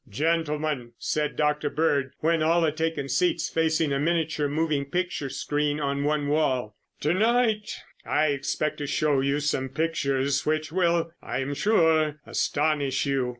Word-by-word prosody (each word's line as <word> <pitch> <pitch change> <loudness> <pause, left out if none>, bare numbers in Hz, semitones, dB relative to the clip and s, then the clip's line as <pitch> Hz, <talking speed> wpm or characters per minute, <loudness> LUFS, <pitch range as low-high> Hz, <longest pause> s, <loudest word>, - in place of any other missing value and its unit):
"Gentlemen," 150 -1 -1
said 150 -1 -1
Dr. 150 0 +1
Bird 145 -4 0
when 165 0 +2
all 165 +2 +3
had 155 -2 +1
taken 160 -3 -2
seats 175 +2 +1
facing 160 -2 +1
a 140 - 0
miniature 160 -1 0
moving 150 -1 0
picture 175 -2 -2
screen 150 +2 -1
on 140 -1 -1
one 150 0 0
wall, 130 -8 0 0.3
"to 155 - +2
night 220 +1 +2 0.3
I 155 0 +1
expect 145 +2 -2
to 145 - -3
show 150 -1 +1
you 140 +2 +1
some 135 -3 -1
pictures 140 -2 0
which 155 0 -1
will, 170 -2 +1
I - - -4
am 140 +2 -3
sure, 160 -5 +2
astonish 145 -3 0
you. 135 -3 0
150 Hz, 150 wpm, -26 LUFS, 140-160 Hz, 0.3 s, all